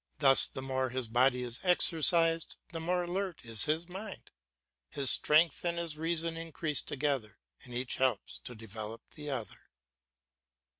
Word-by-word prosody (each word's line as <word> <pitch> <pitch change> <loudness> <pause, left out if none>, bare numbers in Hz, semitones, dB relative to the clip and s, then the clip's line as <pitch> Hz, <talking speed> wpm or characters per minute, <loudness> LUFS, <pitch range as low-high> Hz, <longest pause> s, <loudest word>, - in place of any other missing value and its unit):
Thus 135 -2 +5
the 130 - -8
more 130 -1 -2
his 130 -1 -4
body 125 +2 +2
is 120 -1 0
exercised, 165 -2 +3 0.2
the 165 - -5
more 175 +2 -1
alert 180 -3 -4
is 115 -2 +3
his 160 +3 -1
mind; 195 +4 -9 0.6
his 140 -2 +6
strength 155 +1 +4
and 170 -1 -2
his 170 -3 -4
reason 165 +1 -2
increase 165 -2 -2
together, 135 -6 -3 0.3
and 125 -1 -10
each 125 0 -2
helps 130 -5 -1
to 125 - -7
develop 110 0 -8
the 150 -2 -8
other. 125 -6 -6
150 Hz, 150 wpm, -31 LUFS, 125-165 Hz, 0.6 s, his